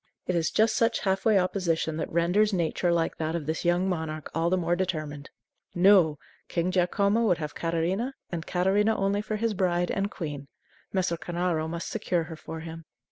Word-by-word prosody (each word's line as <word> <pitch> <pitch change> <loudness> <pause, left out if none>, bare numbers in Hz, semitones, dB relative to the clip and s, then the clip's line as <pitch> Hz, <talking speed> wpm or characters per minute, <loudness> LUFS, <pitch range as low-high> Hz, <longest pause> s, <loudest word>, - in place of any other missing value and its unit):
It 180 - -1
is 165 -2 +1
just 220 +1 +2
such 230 0 +2
half 190 -1 0
way 215 -3 +5
opposition 175 -4 0
that 160 - -3
renders 180 +6 +3
nature 175 0 +1
like 165 -1 0
that 160 +1 -2
of 165 -3 -3
this 160 +2 -2
young 175 +2 +2
monarch 160 -4 -3
all 165 +1 +1
the 185 - +2
more 175 -1 +1
determined. 155 -6 -3 0.5
No! 175 -4 +5 0.3
King 175 +1 -1
Giacomo 200 +4 +2
would 180 -4 +3
have 150 -2 -5
Catarina, 175 +10 -1 0.2
and 170 -2 -4
Catarina 200 +4 +2
only, 195 +1 +1
for 215 0 -3
his 225 +1 0
bride 175 -2 +1
and 200 0 -1
queen. 145 -7 -6 0.4
Messer 180 -3 0
Cornaro 170 -2 -1
must 170 +1 -4
secure 180 -6 -1
her 160 0 -8
for 160 +1 -8
him. 165 0 -8
175 Hz, 190 wpm, -27 LUFS, 165-195 Hz, 0.5 s, way